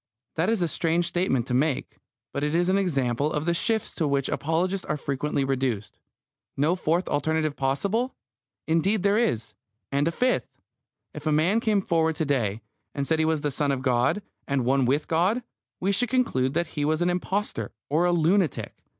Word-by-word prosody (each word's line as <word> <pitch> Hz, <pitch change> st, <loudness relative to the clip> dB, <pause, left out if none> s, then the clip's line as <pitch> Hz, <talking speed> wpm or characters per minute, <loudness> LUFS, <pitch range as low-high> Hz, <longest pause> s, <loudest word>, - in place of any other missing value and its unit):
That 165 Hz, +5 st, +1 dB
is 225 Hz, -5 st, +1 dB
a -, -, +2 dB
strange 165 Hz, +2 st, +1 dB
statement 170 Hz, -9 st, 0 dB
to -, -, -3 dB
make, 135 Hz, +2 st, 0 dB, 0.4 s
but 140 Hz, -, -2 dB
it 150 Hz, +2 st, 0 dB
is 175 Hz, +1 st, +2 dB
an 190 Hz, -, +3 dB
example 140 Hz, -5 st, 0 dB
of 150 Hz, 0 st, -1 dB
the 170 Hz, -, +2 dB
shifts 220 Hz, +6 st, 0 dB
to 160 Hz, -, -1 dB
which 140 Hz, -1 st, 0 dB
apologists 180 Hz, +5 st, 0 dB
are -, -, -1 dB
frequently 140 Hz, 0 st, -1 dB
reduced. 130 Hz, -6 st, -2 dB, 0.6 s
No 155 Hz, +6 st, +2 dB
fourth 175 Hz, 0 st, 0 dB
alternative 155 Hz, 0 st, 0 dB
possible! 200 Hz, -, -1 dB, 0.5 s
Indeed 175 Hz, +5 st, +2 dB
there 200 Hz, +2 st, +3 dB
is; 115 Hz, -, -1 dB, 0.4 s
and 140 Hz, +2 st, +1 dB
a -, -, +1 dB
fifth! 250 Hz, +9 st, 0 dB, 0.6 s
If 150 Hz, +1 st, -6 dB
a -, -, +3 dB
man 165 Hz, +9 st, +3 dB
came 210 Hz, -4 st, +1 dB
forward 160 Hz, -2 st, +1 dB
to 160 Hz, -, -1 dB
day, 115 Hz, -7 st, 0 dB, 0.3 s
and 140 Hz, -1 st, -1 dB
said 160 Hz, +2 st, +1 dB
he 160 Hz, -, +3 dB
was 160 Hz, -2 st, +1 dB
the 145 Hz, -, -1 dB
Son 145 Hz, +1 st, 0 dB
of 130 Hz, -1 st, -2 dB
God, 125 Hz, +10 st, +2 dB, 0.2 s
and 135 Hz, -3 st, 0 dB
one 135 Hz, +1 st, +3 dB
with 140 Hz, +5 st, +1 dB
God, 185 Hz, +9 st, +1 dB, 0.4 s
we 190 Hz, +2 st, +1 dB
should 235 Hz, +4 st, +2 dB
conclude 135 Hz, -, +1 dB
that 170 Hz, -2 st, 0 dB
he 145 Hz, -, -1 dB
was 155 Hz, +3 st, +1 dB
an 175 Hz, -, +2 dB
impostor 190 Hz, +3 st, -2 dB, 0.2 s
or 160 Hz, +5 st, +2 dB
a 175 Hz, -, +3 dB
lunatic. 175 Hz, 0 st, +1 dB
160 Hz, 195 wpm, -26 LUFS, 140-180 Hz, 0.6 s, an